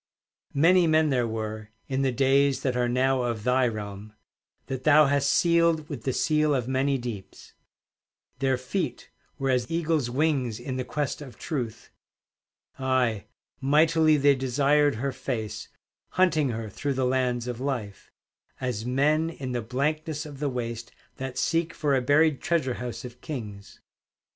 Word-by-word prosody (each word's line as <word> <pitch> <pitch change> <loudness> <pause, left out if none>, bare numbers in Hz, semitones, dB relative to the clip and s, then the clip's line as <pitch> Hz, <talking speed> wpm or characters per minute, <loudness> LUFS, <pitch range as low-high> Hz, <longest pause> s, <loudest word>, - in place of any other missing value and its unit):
Many 170 +4 +5
men 155 -1 +3
there 125 -3 +1
were, 110 -1 -5 0.2
In 135 -1 -1
the 135 -1 +2
days 135 +2 +2
that 130 -2 0
are 125 -1 +1
now 130 +1 +2
of 120 -3 -2
thy 125 +1 +3
realm, 105 -1 -6 0.5
That 130 -1 -5
thou 155 +1 +6
hast 140 0 +2
sealed 170 -2 +3
with 135 -8 -7
the 130 - +1
seal 150 +2 +2
of 125 -3 -1
many 135 +1 +1
deeps; 120 -6 -8 0.9
Their 135 -1 +1
feet 130 0 -4 0.3
were 135 -2 0
as 125 -2 0
eagles' 160 -5 0
wings 130 -4 0
in 130 +1 -4
the 130 - -1
quest 145 +3 -3
of 135 -4 -10
Truth 120 -8 -5 0.9
Aye, 130 -5 +1 0.3
mightily 155 +2 +4
they 145 0 +5
desired 140 +2 +2
her 135 +5 -2
face, 125 -4 -4 0.5
Hunting 165 -6 +3
her 115 -1 -4
through 140 +7 -3
the 130 0 0
lands 125 -2 0
of 120 -1 -4
life, 125 -7 -4 0.5
As 125 -4 -3
men 150 +5 +2
in 135 -6 -6
the 120 -1 -1
blankness 150 +6 -2
of 145 -3 -10
the 145 -1 0
waste 115 -2 -5 0.3
That 130 -1 -5
seek 165 0 0
for 145 -3 +1
a 130 - +2
buried 145 +2 +3
treasure 155 -7 0
house 120 -1 -5
of 125 0 -11
kings. 105 -9 -7
130 Hz, 160 wpm, -26 LUFS, 120-150 Hz, 0.9 s, thou